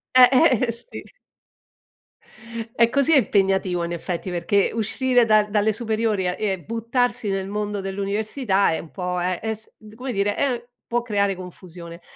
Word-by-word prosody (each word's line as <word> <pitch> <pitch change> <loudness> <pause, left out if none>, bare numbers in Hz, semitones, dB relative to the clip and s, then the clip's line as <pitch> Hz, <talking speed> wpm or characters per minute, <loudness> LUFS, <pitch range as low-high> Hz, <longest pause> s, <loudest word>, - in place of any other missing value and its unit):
Eh, 250 -1 +9 0.4
eh 230 - 0
sì. 235 - -8 1.7
E 235 0 +4
così 280 +5 +3
è - - +7
impegnativo 190 -6 +1
in 170 - -4
effetti, 175 +2 -4
perché 180 +3 +1
uscire 245 +2 +2
dal 215 -1 +3
dalle 210 +1 +2
superiori 220 -4 0
a 180 - -1
e 195 -4 -1
buttarsi 230 0 -1
nel 195 -1 -2
mondo 210 -1 -3
dell'università 200 +1 0
è 160 - -1
un 165 - -11
po' 180 -1 -3
è 180 0 -1
es 220 0 -5 0.2
come 250 +2 -5
dire 205 0 0
è 245 -4 -1 0.2
può 240 0 0
creare 200 -4 0
confusione. 175 -2 -11
205 Hz, 155 wpm, -23 LUFS, 190-230 Hz, 1.7 s, Eh